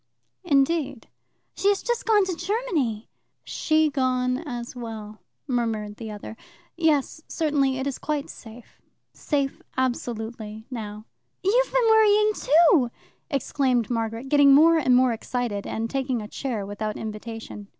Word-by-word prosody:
"Indeed?" 280 -5 +1 0.4
"She 395 - -1
has 405 -1 +2
just 480 -1 -2
gone 420 -3 +4
to 370 -2 -2
Germany." 340 - -2 0.4
"She 310 -1 +1
gone 255 -2 0
as 245 -6 -6
well," 220 -3 -8 0.2
murmured 225 -5 -2
the 225 -2 -7
other. 210 +1 -8 0.4
"Yes, 315 -2 +1
certainly, 285 -5 +1
it 265 - -3
is 280 -2 -3
quite 300 -2 -2
safe 225 +1 -13 0.3
safe, 280 -3 -2 0.2
absolutely, 225 -4 -3
now." 215 -3 -6 0.4
"You've 485 +6 +2
been - - +3
worrying 430 -1 +5
too!" 310 - +4 0.4
exclaimed 260 -4 0
Margaret, 225 +2 -2
getting 285 -1 +6
more 325 +3 +6
and 255 -4 +3
more 255 -1 +4
excited, 230 -3 -3
and 225 +1 -2
taking 265 0 -1
a 210 - -6
chair 230 -4 -4
without 210 +1 -4
invitation. 220 -1 -7
260 Hz, 135 wpm, -25 LUFS, 225-315 Hz, 0.4 s, getting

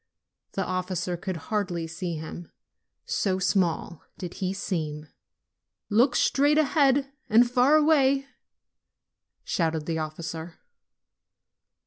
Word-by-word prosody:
The 195 - -1
officer 185 -1 -2
could 180 +1 -4
hardly 185 -6 -1
see 165 +1 -4
him, 160 +2 -8 0.5
so 190 -2 0
small 180 -3 0 0.2
did 180 -2 -6
he 185 -1 0
seem. 155 -6 -3 0.9
"Look 245 +4 +4
straight 290 +2 +3
ahead 275 -2 +3 0.2
and 235 +3 +6
far 250 +4 +4
away!" 280 -3 +4 1.2
shouted 160 -3 -1
the 160 0 -2
officer. 160 +1 -5
185 Hz, 100 wpm, -26 LUFS, 165-250 Hz, 1.2 s, and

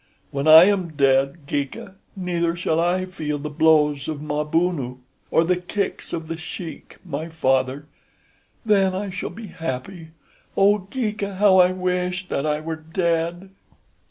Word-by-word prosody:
When 140 +2 -2
I 160 +1 +10
am 185 -4 +1
dead, 140 +2 +2
Geeka, 140 +6 -4 0.2
neither 170 -3 -1
shall 165 -2 0
I 180 +2 +1
feel 155 -5 -4
the 150 +1 -6
blows 150 -2 +3
of 155 -2 -3
Mabunu, 150 -2 -1 0.3
or 165 - +3
the 180 +2 +1
kicks 190 +3 -4
of 165 -1 -4
The 165 0 -4
Sheik, 170 0 -8
my 160 0 -4
father. 135 -2 0 0.8
Then 195 -2 +2
shall 180 - -4
I - - -12
be 225 0 -8
happy. 165 +3 -6 0.5
Oh, 200 -1 +3
Geeka, 210 -5 -3
how 190 -1 +5
I 180 0 +6
wish 180 0 -2
that 140 - -1
I 150 0 0
were 160 0 -4
dead!" 170 +2 -2
165 Hz, 150 wpm, -23 LUFS, 150-185 Hz, 0.8 s, I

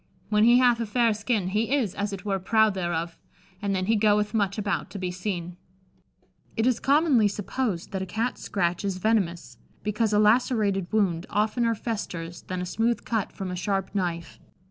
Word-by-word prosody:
When 210 0 +4
he 240 +1 +7
hathe 245 -2 +4
a 230 - -2
fayre 230 +1 +2
skinne, 210 -3 -1
he 215 +4 0
is, 235 -10 0
as 205 0 -2
it 195 0 -7
were, 195 -2 0
proude 220 +2 +3
thereof, 170 -2 -3 0.4
and 200 -1 0
then 185 0 -1
he 225 +3 +2
goethe 210 0 +2
muche 200 -2 0
aboute 205 -4 -2
to - - -7
be 185 -2 -3
seene." 180 -2 -4 1.0
It 225 - +2
is 255 -2 +2
commonly 280 -6 +4
supposed 205 -2 -3
that 190 -2 -3
a 190 - -4
Cat's 225 +6 -2
scratch 180 -2 -1
is 195 -2 -2
venomous, 190 -4 -1 0.2
because 210 +1 0
a 210 - +3
lacerated 210 -4 +2
wound 190 -5 +1
oftener 230 +2 +1
festers 175 -7 -5
than 185 -1 -5
a - - -3
smooth 225 +6 -1
cut 220 -4 -1
from 190 -2 -5
a - - -3
sharp 195 +1 -2
knife. 170 -4 -3
205 Hz, 190 wpm, -26 LUFS, 185-225 Hz, 1.0 s, he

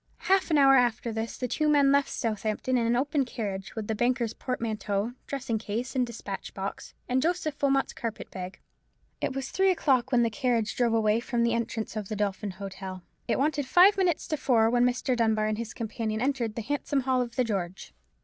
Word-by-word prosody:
Half 385 -1 +2
an 310 - +3
hour 275 -1 +7
after 240 -1 +1
this 225 +1 -4
the 250 - -2
two 300 +6 +1
men 285 -2 +5
left 280 0 +3
Southampton 220 +3 -1
in 235 -2 +2
an 235 - +2
open 280 +3 +1
carriage, 205 -5 -5
with 220 -2 -3
the 220 - -1
banker's 240 0 0
portmanteau, 220 -3 -2
dressing 260 -5 -2
case, 230 +5 -4
and 250 -2 +2
despatch 210 -4 -7
box, 195 0 -6
and 255 +1 +1
Joseph 320 -2 -1
Wilmot's 275 -1 +2
carpet 230 -1 -5
bag. 185 0 -6 0.6
It - - -1
was 270 0 -4
three 385 0 +3
o'clock 265 -8 +2
when 240 -2 +4
the 230 - +1
carriage 235 -3 0
drove 235 -2 +2
away 215 0 +3
from 235 0 -1
the 235 0 +2
entrance 230 -1 -3
of 210 -3 -4
the 215 - -2
Dolphin 205 0 -2
Hotel: 190 -2 -7 0.2
it - - +1
wanted 290 0 0
five 370 +7 +7
minutes 360 -4 +1
to 310 - 0
four 230 -5 +3
when 245 0 +4
Mr. 250 +1 +1
Dunbar 220 -2 +2
and 215 0 -1
his 230 -1 -4
companion 220 -2 -3
entered 245 -4 -1
the 230 - -4
handsome 285 +2 -1
hall 255 0 +1
of 235 -1 -4
the 255 - +2
George. 190 -5 -4
235 Hz, 205 wpm, -28 LUFS, 215-270 Hz, 0.6 s, hour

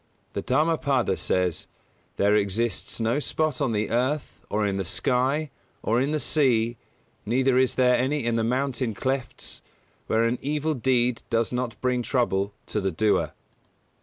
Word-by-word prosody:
The - - -2
Dhammapada 140 - +1
says: 90 -3 0 0.5
"There 100 +1 +3
exists 105 +1 0
no 115 +5 +1
spot 150 -2 -1
on 135 -4 +1
the 105 -1 -1
earth, 130 +5 -1
or 105 +1 0
in 100 -1 0
the 95 - -1
sky, 135 - 0 0.3
or 115 +3 +2
in 135 - +1
the 155 - +1
sea, 120 -7 +2 0.5
neither 130 +3 +2
is 130 -1 +2
there 125 -1 +4
any 135 +1 0
in 120 -1 +1
the 115 - +1
mountain 125 -1 -1
clefts, 130 +1 -3 0.5
where 110 +1 +2
an 115 +2 0
(evil) 150 +2 -1
deed 125 -2 +1
does 115 -1 +1
not 125 -2 -3
bring 125 -1 +1
trouble 105 -6 0
(to 105 - -2
the 95 - 0
doer)." 105 +6 +1
125 Hz, 160 wpm, -25 LUFS, 110-135 Hz, 0.5 s, there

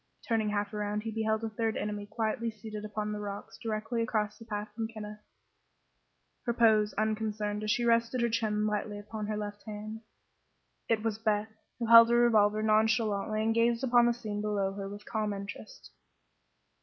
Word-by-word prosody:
Turning 225 -4 +1
half 205 0 -2
around 210 0 -2
he 225 - -3
beheld 220 0 0
a 225 - -1
third 225 0 -1
enemy 205 -1 -3
quietly 225 +1 -1
seated 215 -1 -8
upon 210 0 -3
the 210 - -3
rocks 205 -1 -7
directly 225 +1 -2
across 215 -2 -1
the 225 - -11
path 210 -1 -4
from 225 0 -3
Kenneth, 210 -1 -8 1.3
her 235 - +1
pose 215 -3 +4
unconcerned 215 -1 -1
as 215 - -2
she 240 +3 +2
rested 230 +1 +2
her 235 - +3
chin 215 -2 0
lightly 210 0 -2
upon 210 +1 -6
her 215 0 -2
left 205 -1 -5
hand. 215 +1 -6 0.9
It 220 -2 +2
was 220 -1 -1
Beth, 215 -1 0 0.3
who 235 - -2
held 230 0 +9
her 235 - +4
revolver 215 -3 +4
nonchalantly 215 -1 +2
and 225 +1 +2
gazed 230 +2 +2
upon 240 -2 +5
the 240 - +3
scene 210 -3 -4
below 200 -2 0
her 195 0 -5
with 205 +1 -9
calm 215 -2 -1
interest. 200 +2 -9
215 Hz, 180 wpm, -30 LUFS, 210-225 Hz, 1.3 s, held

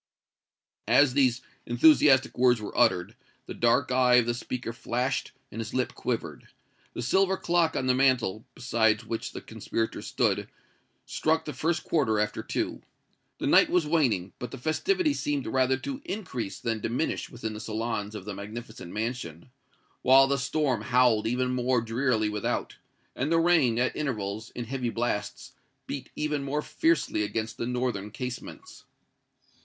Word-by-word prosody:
As 130 +3 +5
these 130 -2 +2 0.3
enthusiastic 135 +1 +5
words 125 -1 +4
were 105 - -7
uttered, 90 -1 +2 0.3
the - - -7
dark 125 +3 +2
eye 125 -1 +4
of 125 -1 +5
the 120 - 0
speaker 120 0 -5
flashed 125 +3 -2 0.2
and 115 - -5
his 110 +1 -6
lip 130 -1 0
quivered. - - -4 0.5
The 120 - -3
silver 190 +8 +2
clock 170 -2 +1
on 130 - -1
the 130 - +3
mantel, 125 -5 +2
beside 110 -3 +1
which 115 - -4
the - - -7
conspirators 115 0 -4
stood, - - 0 0.6
struck 160 +1 0
the 150 - -5
first 160 +5 -1
quarter 130 -10 +1
after 105 0 -1
two. - - -3 0.6
The - - -4
night - - +5
was 180 -3 +2
waning, 125 - +1
but 125 - -5
the 135 - -8
festivity 305 - +1
seemed 145 - -2
rather 130 +2 +2
to 270 - -6
increase 125 - -5
than 115 -2 -2
diminish 120 +9 -2
within 115 -3 -5
the 105 - -7
salons 110 -1 -3
of 100 -3 -7
the 105 - -5
magnificent 100 -2 -8
mansion, 110 -3 -5 0.5
while 135 +1 +7
the 140 0 0
storm 140 -3 0
howled 120 -2 +3
even 125 +2 0
more 125 0 +1
drearily 115 -1 0
without, 105 -1 -2 0.4
and 140 +5 -1
the 165 - +4
rain, 160 -9 +3
at 130 +1 +1
intervals, 110 -7 -3
in 120 - -4
heavy 125 0 -2
blasts, 115 -3 -3 0.3
beat 135 -2 -6
even 150 -2 -1
more 145 +2 -2
fiercely 160 -9 +1
against 110 +2 -3
the 115 - -3
northern 125 -5 -2
casements. 125 - -8
125 Hz, 160 wpm, -27 LUFS, 110-140 Hz, 0.6 s, while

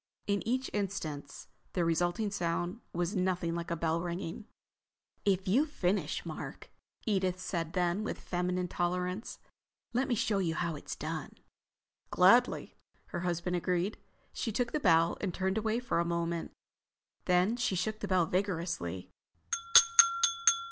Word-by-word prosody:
In 200 -1 0
each 255 +2 -1
instance 160 -9 -4 0.3
the 175 -2 +1
resulting 175 +5 0
sound 175 +1 -2
was 175 +4 -2
nothing 180 -2 0
like 170 0 -4
a 170 - 0
bell 165 0 0
ringing. 175 +3 -5 0.8
"If 190 -2 +1
you've 270 +11 +3
finished, 195 -7 -1
Mark," - - -7 0.3
Edith 190 -4 0
said 170 -2 -3
then, 180 +2 +1
with - - -3
feminine 180 0 -1
tolerance, 180 +4 -2 0.6
"let 255 +2 +1
me 245 - +1
show 220 -2 +1
you 165 -4 0
how 170 -2 -1
it's 145 - -6
done." - - -5 0.7
"Gladly," - - +4 0.4
her 175 - -3
husband 175 0 -1
agreed. 180 +3 -1 0.3
She 225 - -2
took 240 +2 -1
the 305 - 0
bell 165 - +3
and 195 - -1
turned 190 +2 0
away 220 +2 0
for 245 -8 -1
a - - +3
moment. 170 0 -2 0.8
Then 180 +5 +3
she 240 -5 0
shook 215 +4 -2
the 205 - -4
bell 185 -3 +3
vigorously. 170 - -2
180 Hz, 140 wpm, -31 LUFS, 170-200 Hz, 0.8 s, Gladly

